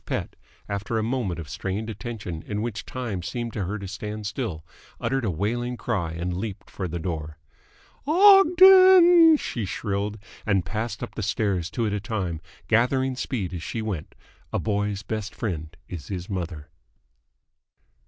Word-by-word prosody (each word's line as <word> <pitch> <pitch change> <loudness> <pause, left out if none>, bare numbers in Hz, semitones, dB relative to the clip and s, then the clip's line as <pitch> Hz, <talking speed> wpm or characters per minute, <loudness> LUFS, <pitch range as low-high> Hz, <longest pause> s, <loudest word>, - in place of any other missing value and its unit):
Pett, - - -3 0.3
after 100 +3 -2
a 110 - 0
moment 110 -8 -1
of 80 - -6
strained 95 +7 -3
attention 100 -6 -6
in 105 0 -2
which 115 -3 -4
time 120 -8 -4
seemed 120 +6 -4
to 100 -4 -2
her 105 +4 -3
to 100 -2 -7
stand 105 +2 -6
still, 100 - -4 0.3
uttered 135 -1 -1
a 110 - 0
wailing 120 +8 -2
cry 95 -11 -2
and 90 +2 -3
leaped 100 +1 -6
for 95 - -4
the 85 +1 -4
door. 80 -3 -4 0.7
"Ogden!" 370 -2 +8
she 120 - -4
shrilled; 100 +2 -2 0.3
and 100 -5 +1
passed 110 0 -3
up - - -6
the - - -5
stairs 100 -4 0
two 115 +1 -1
at 105 - -1
a 105 - 0
time, 95 -7 -3 0.3
gathering 130 +3 +2
speed 105 -8 -3
as 85 - -4
she 110 +6 -4
went. 100 -8 -5 0.4
A - - 0
boy's 105 -1 -1
best 110 +1 -4
friend 85 -7 -4
is 85 -6 -7
his 90 -2 -5
mother. 85 -6 -5
105 Hz, 165 wpm, -25 LUFS, 90-120 Hz, 0.7 s, Ogden